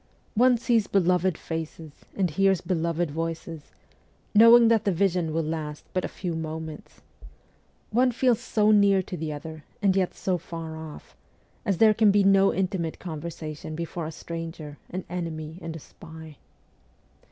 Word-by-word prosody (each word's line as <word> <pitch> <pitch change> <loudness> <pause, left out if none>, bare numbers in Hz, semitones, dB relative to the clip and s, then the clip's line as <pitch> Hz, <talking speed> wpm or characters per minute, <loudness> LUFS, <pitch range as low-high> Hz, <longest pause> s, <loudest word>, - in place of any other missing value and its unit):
One 245 +2 +4
sees 230 -2 +1
beloved 185 -2 +2
faces 160 -1 -6 0.3
and 185 -4 +1
hears 195 +2 +3
beloved 170 -2 -1
voices, 165 0 -5 0.6
knowing 230 +2 +8
that 225 -2 +3
the 200 - +1
vision 180 -2 +1
will 165 +1 0
last 155 -1 -5
but 185 - 0
a - - -1
few 180 -2 -5
moments; 160 -1 -7 0.9
one 250 +3 +3
feels 245 -1 +2
so 215 -1 +2
near 200 -2 +4
to 185 - -6
the 160 -2 -4
other, 155 +1 -8 0.2
and 195 -3 +2
yet 185 -2 0
so 185 -2 -1
far 165 -1 -7
off, 160 -1 -10 0.5
as 195 -3 +1
there 220 +1 +6
can 215 -1 +4
be 200 0 +4
no 195 0 +5
intimate 180 -3 -2
conversation 155 -2 -6
before 170 0 -4
a - - -5
stranger, 165 -2 -7
an 185 +1 -5
enemy 165 -2 -5
and 165 -1 -6
a - - -6
spy. 160 0 -13
170 Hz, 155 wpm, -26 LUFS, 160-195 Hz, 0.9 s, knowing